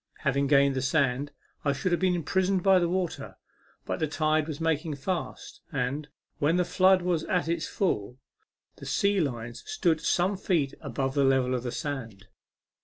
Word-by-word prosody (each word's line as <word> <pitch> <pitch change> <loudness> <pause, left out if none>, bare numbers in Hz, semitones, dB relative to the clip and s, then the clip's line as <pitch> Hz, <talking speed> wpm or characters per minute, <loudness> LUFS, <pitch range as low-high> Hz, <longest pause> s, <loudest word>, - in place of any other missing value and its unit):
Having 140 -1 +1
gained 140 -1 +4
the 130 - -1
sand, 140 0 +1 0.3
I 140 - +2
should 140 +7 -2
have 175 - +1
been 185 -1 +3
imprisoned 185 +3 0
by 190 -1 +6
the 175 -1 +1
water; 180 -1 -3 0.5
but - - -3
the 155 - 0
tide 155 0 +1
was 155 -3 -5
making 160 -1 0
fast, 170 +5 -5
and, 140 +1 -2 0.3
when 150 +4 +2
the 180 0 +2
flood 185 0 +4
was 175 -3 0
at 180 -3 0
its 165 -1 -1
full, 125 - -1 0.6
the - - -9
sea 200 0 +2
line 120 -7 -2
stood 170 - -1
some 185 +3 +1
feet 165 -8 0
above 135 -1 -2
the 140 -1 +2
level 130 -1 +3
of 125 - -1
the 120 0 -4
sand. 115 - -5
155 Hz, 180 wpm, -28 LUFS, 135-180 Hz, 0.6 s, by